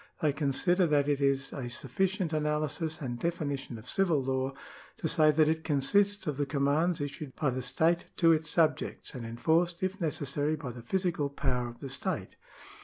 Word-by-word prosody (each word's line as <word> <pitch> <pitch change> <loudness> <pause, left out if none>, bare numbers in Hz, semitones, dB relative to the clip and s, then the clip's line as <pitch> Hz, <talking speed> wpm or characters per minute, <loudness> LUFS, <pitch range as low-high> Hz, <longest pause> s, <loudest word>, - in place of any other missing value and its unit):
They 150 -2 +2
consider 160 +6 +2
that 145 -2 +2
it 145 -1 +1
is 135 -1 +1
a 125 -3 -4
sufficient 180 - -1
analysis 155 +1 -1
and 120 -3 -4
definition 145 -7 -3
of 110 +3 -12
civil 175 -4 +2
law, 130 0 -1 0.4
to - - -6
siy 155 -1 +5
that 155 -1 +5
it 160 0 0
consists 200 +8 +2
of 150 -3 -2
the 145 -1 0
commands 150 +5 +1
issued 145 -1 -5
by 145 -4 +1
the 130 +1 -3
state 160 +7 +1
to 165 -2 +5
its 160 -1 +1
subjects, 155 -2 0
and 125 -4 -6
enforced, 165 +9 +1
if 190 +1 -2
necessary, 145 -1 -1
by 140 -5 -6
the 120 0 -9
physical 170 +1 -1
power 125 -3 -1
of 120 - -13
the 135 - -5
state. 135 - -3
150 Hz, 180 wpm, -30 LUFS, 135-165 Hz, 0.4 s, siy